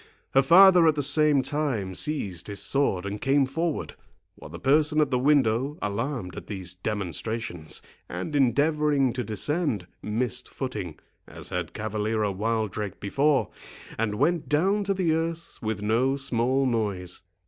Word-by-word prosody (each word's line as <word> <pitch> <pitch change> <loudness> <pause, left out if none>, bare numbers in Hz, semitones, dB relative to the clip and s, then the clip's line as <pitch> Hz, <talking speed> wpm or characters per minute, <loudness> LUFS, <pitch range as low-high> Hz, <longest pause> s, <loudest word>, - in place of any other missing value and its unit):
Her 135 - +6
father 175 +3 +7
at 155 - +4
the 145 - -1
same 145 -1 +4
time 135 -9 -1
seized 100 - -1
his 100 -1 -5
sword 120 -10 0
and 100 +1 -5
came 140 0 +3
forward, 160 +4 -2 0.4
while - - -12
the - - -8
person 150 +3 +2
at 150 -3 +2
the 125 - +2
window, 135 0 +2
alarmed 105 - -3
at - - -8
these 95 -3 -5
demonstrations, 90 -2 -4 0.3
and 95 - -4
endeavouring 145 0 +2
to 125 - -3
descend, 110 - -1 0.2
missed 120 +3 -2
footing, 105 - -5 0.3
as - - -10
had - - -4
Cavaliero 110 0 -1
Wildrake 105 -1 -2
before, 140 +7 +1 0.4
and 110 -2 -1
went 160 +7 0
down 195 +8 +2
to 195 0 0
the 180 -4 +1
earth 165 +1 -3
with 110 -3 -3
no 120 +6 +2
small 130 0 0
noise. 100 -8 -2
130 Hz, 150 wpm, -26 LUFS, 105-150 Hz, 0.4 s, father